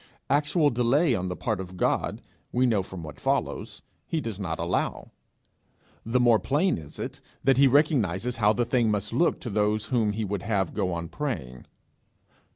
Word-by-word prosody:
Actual 145 +1 +3
delay 125 +5 +3
on 95 -4 -1
the 90 - -3
part 110 -3 -2
of 95 -1 -7
God, - - 0 0.3
we 125 +1 +2
know 110 -5 +2
from 95 -2 -8
what 75 -2 -9
follows, - - -2 0.2
he 165 - -1
does 115 -8 -5
not 80 -5 -3
allow; 85 +2 -2 0.9
the 115 +3 +1
more 120 -3 +5
plain 150 - +1
is 75 -1 -11
it - - -6 0.2
that 135 -1 +4
he 140 0 +6
recognizes 125 - +2
how 105 -2 +4
the 120 +3 0
thing 120 -1 +2
must 105 -1 -1
look 170 - +2
to 120 - -4
those 105 +1 +1
whom 110 -2 +1
he 110 +1 -2
would 100 -1 -3
have 95 -5 -1
go 95 -3 -1
on 85 -1 -3
praying. 80 - -5
110 Hz, 180 wpm, -27 LUFS, 95-130 Hz, 0.9 s, he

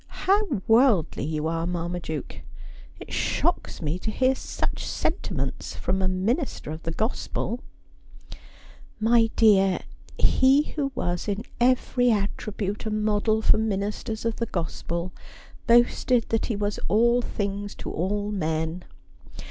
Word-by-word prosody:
' - - -33 0.2
How 395 - +2
worldly 225 - +4
you 155 0 -2
are, 165 +1 -1
Marmaduke! 170 -4 -4 0.6
It - - -9
shocks - - -1
me 155 +4 -1
to 220 - -3
hear 260 +4 +2
such - - -4
sentiments - - -3
from 190 +1 -1
a 190 - +2
minister 195 - -1
of 155 +1 -6
the 165 - -3
gospel.' 225 +4 -2 0.6
' - - -19
My 225 +1 +4
dear, 195 -4 +4 0.4
he 270 +3 +4
who 280 -3 -1
was 175 0 -2
in 205 +1 -2 0.2
every 245 0 +3
attribute 205 0 -2
a - - 0
model 215 +1 +1
for - - +5
minis 210 -1 -1
ters 220 0 -5
of 230 -1 -1
the 230 - -2
gospel 170 0 -3 0.6
boasted 240 0 +4
that 225 - 0
he 230 - -1
was 205 0 -2
all 235 +3 +4
things 205 -2 -3
to - - -6
all 205 +4 -1
men. 160 -2 -2
210 Hz, 140 wpm, -25 LUFS, 180-230 Hz, 0.6 s, for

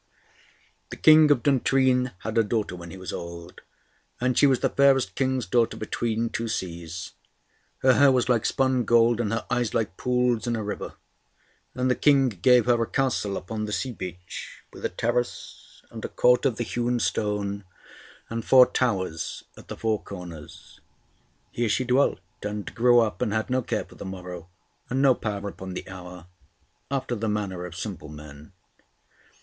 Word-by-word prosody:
The - - -6
King 155 -1 +7
of 135 -6 +3
Duntrine 130 -1 +2
had 110 0 -4
a 115 - +4
daughter 105 -3 -2
when 85 -1 -9
he 95 - -9
was 95 0 -6
old, 85 0 -8 0.6
and 125 0 +1
she 140 - +5
was 130 -3 +2
the - - +2
fairest 135 -7 +3
King's 130 +1 0
daughter 120 -2 +1
between 115 +1 -2
two 115 - -3
seas; 85 -4 -5 0.7
her 130 0 +6
hair 140 +1 +6
was 125 -2 +2
like 120 -3 +2
spun 130 -2 +1
gold, 120 0 +4
and 105 -3 -2
her 115 - -2
eyes 120 -2 0
like 100 -5 -1
pools 125 -2 +1
in 120 - 0
a 110 - -3
river; 105 - -5 0.8
and 125 0 0
the 130 - +3
King 140 -3 +4
gave 120 +4 +4
her 120 -1 +3
a 115 - 0
castle 120 -7 -1
upon 110 +3 -4
the 105 - -5
sea 130 +4 -2
beach, 90 -4 -8
with - - -12
a - - 0
terrace, 120 +5 -4
and - - -8
a - - -3
court 125 +3 +3
of 125 - -1
the 120 - -1
hewn 120 +1 -1
stone, 105 -2 -1 0.6
and 115 0 -4
four 130 +1 +7
towers 95 -12 -2
at - - -14
the - - -7
four 110 -2 0
corners. 85 -6 -10 0.7
Here 120 -1 -1
she 130 - +1
dwelt 125 +3 +2 0.2
and 105 0 -5
grew 120 0 +5
up, 110 0 -2
and 120 -4 0
had 110 +3 -1
no 130 0 +2
care - - -2
for - - -17
the - - -9
morrow, 90 -2 -8 0.4
and 130 - -1
no 135 -1 +5
power 105 -4 -4
upon 95 -1 -8
the - - -6
hour, 90 -2 -10 0.6
after 135 -3 -2
the 110 -1 -2
manner 100 -4 -3
of 85 - -11
simple 95 -6 -6
men. 75 -1 -12
115 Hz, 180 wpm, -25 LUFS, 95-125 Hz, 0.8 s, King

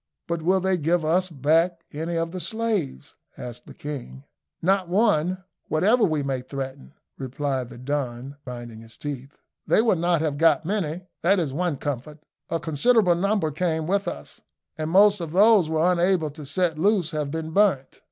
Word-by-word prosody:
"But 170 -1 -2
will 185 +4 +3
they 190 -1 +1
give 165 +2 +1
us 180 +4 +2
back 165 +4 +1
any 165 +3 -3
of 165 0 -1
the 185 - -5
slaves?" 215 - -2 0.2
asked 120 0 -8
the - - -12
king. 125 - -7 0.4
"Not 185 0 +1
one 185 -3 +2 0.2
whatever 210 +10 +3
we 155 -7 +1
may 135 -2 -2
threaten," 135 +2 -7 0.2
replied 135 -1 -3
the - - -11
Don, 130 0 -4
grinding 120 -3 -8
his 115 0 -13
teeth. 140 -1 -7 0.3
"They - - +4
will 225 -5 +3
not 170 -1 +1
have 150 -3 -1
got 165 -1 +4
many, 180 -4 -2 0.2
that 195 +4 +3
is 150 -6 -2
one 170 -1 -1
comfort. 145 +2 -5 0.3
A 165 - -1
considerable 180 - +3
number 190 -2 0
came 160 0 -1
with 200 +4 0
us, - - -7 0.3
and 155 -2 -3
most 200 +2 +5
of 165 -2 -5
those 200 -3 +5
we 160 - -2
were 165 +3 +3
unable 175 -3 +1
to 150 -1 -10
set 170 -1 0
loose 190 -3 +2
have 150 -2 -2
been 160 +1 -4
burnt. 185 -8 +1
160 Hz, 180 wpm, -24 LUFS, 145-185 Hz, 0.4 s, most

